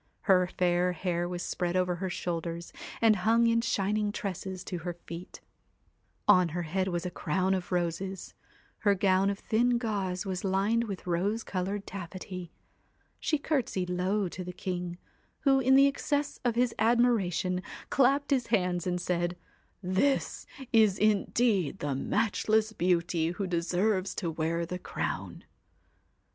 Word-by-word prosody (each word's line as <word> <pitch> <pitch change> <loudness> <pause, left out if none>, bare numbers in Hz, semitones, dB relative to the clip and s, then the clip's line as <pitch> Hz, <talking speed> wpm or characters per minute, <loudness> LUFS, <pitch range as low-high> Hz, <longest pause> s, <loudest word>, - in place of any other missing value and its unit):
Her 185 -3 +4
fair 180 0 +1
hair 175 0 -1
was 180 0 -4
spread 175 0 -2
over 180 -1 +1
her 190 +1 -3
shoulders, 170 -1 -4 0.3
and 220 -2 +6
hung 225 +5 +3
in 230 0 +3
shining 210 -1 0
tresses 190 -2 -5
to 180 - -4
her 175 +1 -4
feet; 170 +2 -8 0.9
on 180 -2 +6
her 175 - -1
head 185 +4 -1
was 175 -1 -2
a 180 - -3
crown 185 +4 0
of 185 -1 -3
roses; 180 +2 -2 0.5
her 205 -2 +3
gown 190 0 +3
of 200 - -2
thin 240 +3 +2
gauze 200 -5 -2
was 185 -2 -3
lined 200 +4 +1
with 200 -4 -6
rose 195 +6 0
coloured 195 +2 -3
taffety; 185 -1 -7 0.7
she 305 - +1
curtsied 250 - -1
low 185 +3 0
to 185 +1 -6
the 180 - -6
king, 180 -1 -4 0.4
who, 270 -2 +4
in 265 0 +4
the 275 +1 +7
excess 285 +1 -1
of 240 -2 +1
his 245 0 +2
admira 235 -4 +3
tion, 180 +1 -1 0.3
clapped 275 +2 +3
his 255 -4 +2
hands, 180 -2 +1
and 180 0 0
said: 175 0 -1 0.3
' - - -41 0.2
This 280 -1 +1 0.3
is 215 -4 +5
indeed 210 - +2
the 145 -5 -2
matchless 215 +8 +1
beauty 170 -3 +1
who 195 +2 -3
deserves 185 +3 0
to 170 -4 -2
wear 165 +1 -1
the 180 +2 -5
crown.' - - -4
185 Hz, 155 wpm, -29 LUFS, 175-215 Hz, 0.9 s, the